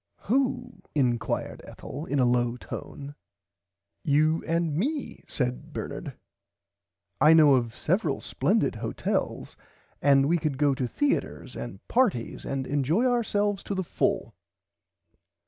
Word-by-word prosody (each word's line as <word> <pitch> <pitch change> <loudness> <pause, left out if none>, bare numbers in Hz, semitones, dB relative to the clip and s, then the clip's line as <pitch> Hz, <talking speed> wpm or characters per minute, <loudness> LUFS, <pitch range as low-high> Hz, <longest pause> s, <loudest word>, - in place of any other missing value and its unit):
Who 250 -3 -1
inquired 120 -5 0
Ethel 150 +5 -8
in 145 - -1
a 130 - +4
low 120 0 +1
tone. 140 +3 -8 0.9
You 155 +3 +2
and 165 -2 0
me 280 - -2
said 125 -2 -2
Bernard - - -5 1.1
I 155 +3 +8
know 155 -3 +7
of 120 -3 +1
several - - 0
splendid - - 0
hotels - - -2 0.5
and 140 -1 +5
we 170 +2 +2
could 150 -4 -2
go 145 0 +3
to 130 -2 -2
theaters 290 - -1
and - - -8
parties 220 - 0
and 135 -1 -2
enjoy 145 - +1
ourselves 210 -5 +1
to 200 - -4
the 190 - -1
full. - - -1
150 Hz, 125 wpm, -27 LUFS, 135-200 Hz, 1.1 s, I